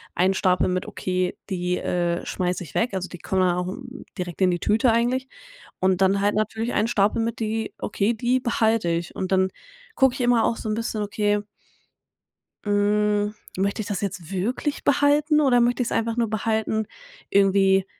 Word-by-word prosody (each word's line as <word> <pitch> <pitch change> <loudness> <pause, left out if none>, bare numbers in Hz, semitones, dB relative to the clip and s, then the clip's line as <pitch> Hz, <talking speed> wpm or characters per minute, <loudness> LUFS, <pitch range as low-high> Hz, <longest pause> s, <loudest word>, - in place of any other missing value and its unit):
einen 185 +2 +3
Stapel 185 -1 +2
mit 185 0 -1
„okay, 185 -1 -2
die, 180 -1 -1
äh, 175 -1 -1
schmeiße 180 0 -2
ich 165 - -13
weg,“ 230 -2 +1
also 185 -1 -2
die 175 - -10
kommen 190 +3 0
dann 180 -1 +3
auch 180 0 -2
n 250 +6 -8
direkt 180 -1 -5
in 185 -1 +4
die 175 - -1
Tüte 225 +6 +3
eigentlich. 250 +3 0 0.5
Und 185 0 +2
dann 195 +1 +3
halt 205 +1 +1
natürlich 220 +2 -1
einen 215 +2 +1
Stapel 210 0 +2
mit 230 0 -3
die 220 0 -2
„Okay, 205 +2 0
die 245 +3 0
behalte 225 -5 +1
ich.“ 170 0 -2
Und 190 0 -3
dann 190 0 +3 0.5
gucke 265 -2 +4
ich - - -7
immer 240 -2 +3
auch 230 - +1
so - - -6
'n 215 - 0
bisschen, 225 -1 -3
okay 205 0 0 1.3
hm, 205 0 +1 0.2
möchte 200 +3 0
ich 205 - -6
das 205 -4 -3
jetzt 185 -4 -5
wirklich 235 +10 -2
behalten 290 +2 +3
oder 250 -4 +4
möchte 245 +1 +2
ich 240 - 0
's - - -11
einfach 225 0 0
nur 235 -2 0
behalten 220 0 -1 0.5
irgendwie, 195 -1 +4
210 Hz, 190 wpm, -24 LUFS, 185-230 Hz, 1.3 s, in